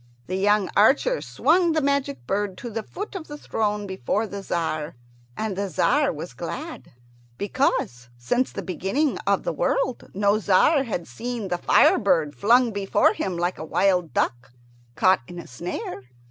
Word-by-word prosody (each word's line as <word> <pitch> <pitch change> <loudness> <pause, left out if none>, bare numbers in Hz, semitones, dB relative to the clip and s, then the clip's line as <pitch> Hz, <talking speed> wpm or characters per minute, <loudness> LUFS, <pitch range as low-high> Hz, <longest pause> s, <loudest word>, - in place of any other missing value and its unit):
The 185 - -3
young 205 +1 +2
archer 285 - +4
swung 345 -2 +2
the 315 - +2
magic 275 - -1
bird 195 +3 -2
to 240 - -7
the 225 +1 -3
foot 410 - -7
of 365 -5 -6
the 295 - -8
throne 210 -6 -2
before 190 - -1
the 200 -2 -6
Tzar; 160 -4 -3 0.4
and 215 -3 -2
the 200 0 -2
Tzar 160 - +2
was - - -7
glad, - - -7 0.4
because 125 - -1
since 245 - 0
the - - -6
beginning 195 - -1
of - - +2
the - - -2
world - - -1
no 205 +1 +2
Tzar 265 - +3
had 175 -8 -4
seen 230 - -5
the 175 0 -1
fire - - +5
bird 150 -3 +1
flung 235 - +4
before 200 -2 +2
him 185 -3 -3
like 175 +1 -1
a - - -5
wild 180 0 +1
duck 120 0 -2 0.4
caught 185 -5 +4
in 175 - -9
a 170 - -7
snare. 135 0 -6
200 Hz, 170 wpm, -24 LUFS, 175-245 Hz, 0.4 s, fire